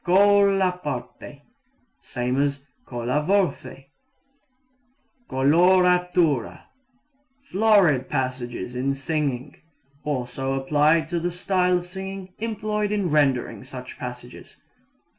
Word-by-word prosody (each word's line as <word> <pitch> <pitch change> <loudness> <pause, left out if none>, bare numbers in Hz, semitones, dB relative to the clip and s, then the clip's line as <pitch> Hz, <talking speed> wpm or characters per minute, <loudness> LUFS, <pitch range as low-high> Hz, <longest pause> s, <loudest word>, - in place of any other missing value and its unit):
Colla 195 -1 +4
parte 140 +1 -6 0.6
same 125 +2 -2
as 140 -1 -1 0.2
colla 120 +4 -1
voce. 180 -6 -1 1.4
Coloratura 180 0 +3 0.8
florid 200 - +3
passages 125 -3 -3
in 135 +2 -1
singing. 135 -2 -3 0.5
Also 135 -1 -3
applied 150 +4 +2
to 170 +1 -2
the 175 +1 -1
style 180 0 +1
of 175 - -5
singing 190 0 -8
employed 215 -2 -2
in 200 -5 -1
rendering 140 -5 +1
such 130 0 -10
passages. 125 0 -9
155 Hz, 90 wpm, -24 LUFS, 130-185 Hz, 1.4 s, Colla